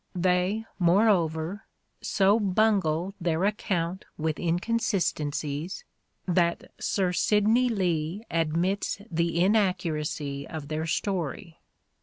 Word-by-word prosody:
They, 180 +4 +1
moreover, 175 -1 +2 0.3
so 200 +2 +3
bungle 195 -4 +1
their 170 +1 +1
account 190 -4 -1
with 160 0 -2
inconsistencies 170 - -1 0.4
that 170 -2 0
Sir 185 -3 0
Sidney 220 +6 +3
Lee 180 -1 -1
admits 170 +4 0
the 170 0 0
inaccuracy 165 -8 0
of 155 -3 -7
their 155 +1 -2
story. 170 -1 -3
180 Hz, 90 wpm, -27 LUFS, 160-200 Hz, 0.4 s, so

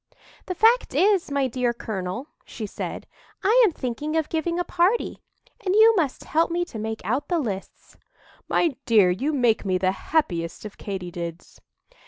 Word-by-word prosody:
"The 365 - -3
fact 460 +6 +3
is, 390 -4 +3
my 280 -1 +1
dear 250 -1 0
colonel," 215 +3 -5
she 225 - -7
said, 205 - -6 0.4
"I 445 +6 +5
am 420 - +4
thinking 295 +3 -4
of 315 -2 0
giving 335 +1 -1
a 355 - +1
party, 360 +7 +1 0.4
and 380 -1 +1
you 445 +1 +7
must 310 -9 0
help 325 +2 +1
me 350 +1 0
to 225 - -8
make 220 +1 -4
out 260 +8 -1
the 350 - +1
lists." 205 - -5 0.5
"My 345 - +3 0.2
dear, 210 -6 +5
you 260 +12 -1
make 245 -6 +2
me 185 -2 +1
the 185 0 +1
happiest 175 - -1
of 210 - -9
Katy 190 -3 -5
dids." 170 -1 -7
265 Hz, 175 wpm, -24 LUFS, -, 0.5 s, you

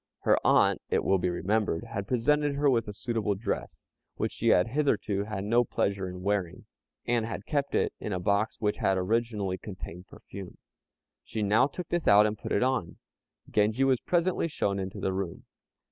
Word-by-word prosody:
Her - - +3
aunt, - - +4
it - - +1
will 95 -1 +2
be 90 - 0
remembered, 95 0 0
had 100 0 -5
presented 145 +4 +2
her 140 0 +3
with 115 -3 +1
a - - -4
suitable 110 -1 -2
dress, 100 - -4 0.3
which - - -2
she - - -3
had 90 +5 +4
hitherto 115 -7 0
had 105 -2 -4
no 115 +4 +3
pleasure 100 -4 -1
in 90 0 -8
wearing, 100 -4 -1 0.4
and 120 -1 +1
had 115 - -5
kept 140 -2 -1
it - - +1
in 105 - -5
a 90 - -1
box 100 +4 0
which 105 -1 0
had 95 0 +1
originally 105 -1 -1
contained 90 -3 -9
perfume. 95 -2 -10 0.7
She 110 -2 -3
now 110 +6 +4
took 170 +4 -7
this 175 -1 -1
out 105 +1 +7
and 105 0 0
put - - -8
it 100 - +2
on. 130 -9 -1 0.5
Genji 110 +5 +2
was 130 -2 +3
presently 175 0 +1
shown 100 -10 -1
into 95 0 -5
the 95 - -1
room. 95 -3 -4
105 Hz, 190 wpm, -28 LUFS, 95-120 Hz, 0.7 s, out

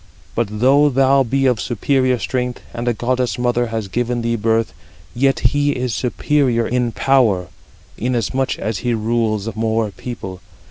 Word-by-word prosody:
But 120 -1 0
though 140 +3 +5
thou 135 +1 +4
be 135 +2 +1
of 125 -4 +2
superior 130 +2 +1
strength, 125 +1 -3
and 120 +1 -4
a 120 - +3
goddess 125 +2 -1
mother 120 0 +1
has 110 -2 -3
given 120 +4 -2
thee 115 0 0
birth, 115 +1 0 0.4
yet 135 +2 +1
he 145 0 +2
is 125 -2 -2
superior 125 +1 +1
in 125 -1 0
power, 110 -9 +2 0.5
inasmuch 125 +2 -1
as 110 -2 -3
he 120 0 0
rules 110 -1 -1
more 110 -1 0
people. 95 -6 -7
120 Hz, 150 wpm, -19 LUFS, 115-130 Hz, 0.5 s, though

